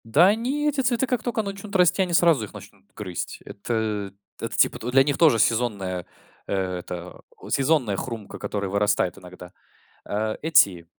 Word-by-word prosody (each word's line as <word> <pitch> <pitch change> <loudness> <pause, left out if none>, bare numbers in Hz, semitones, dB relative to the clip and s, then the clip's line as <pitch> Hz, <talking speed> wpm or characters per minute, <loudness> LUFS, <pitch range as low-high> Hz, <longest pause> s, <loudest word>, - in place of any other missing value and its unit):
Да 150 +11 +5
они, 250 +8 0
эти 290 -2 0
цветы, 245 0 +1
как 250 -3 -1
только 230 -2 -1
начнут 200 +1 -7
расти, 180 +1 +4
они 180 -2 -1
сразу 165 -9 +4
их - - -15
начнут - - -13
грызть. 90 -5 -5
Это 105 -2 -3 0.3
это - - -4
типа - - +2
для 135 +1 +6
них 140 0 -1
тоже 155 -8 +6
сезонная, 100 -6 0 0.4
э, - - -3 0.3
это 90 0 -8 0.3
сезонная 135 -7 +2
хрумка, 115 -4 -6
которая 100 -2 -3
вырастает 100 -3 +1
иногда. 90 -1 -12 0.5
Э, 110 +1 -2
эти 100 - +4
115 Hz, 160 wpm, -24 LUFS, -, 0.5 s, для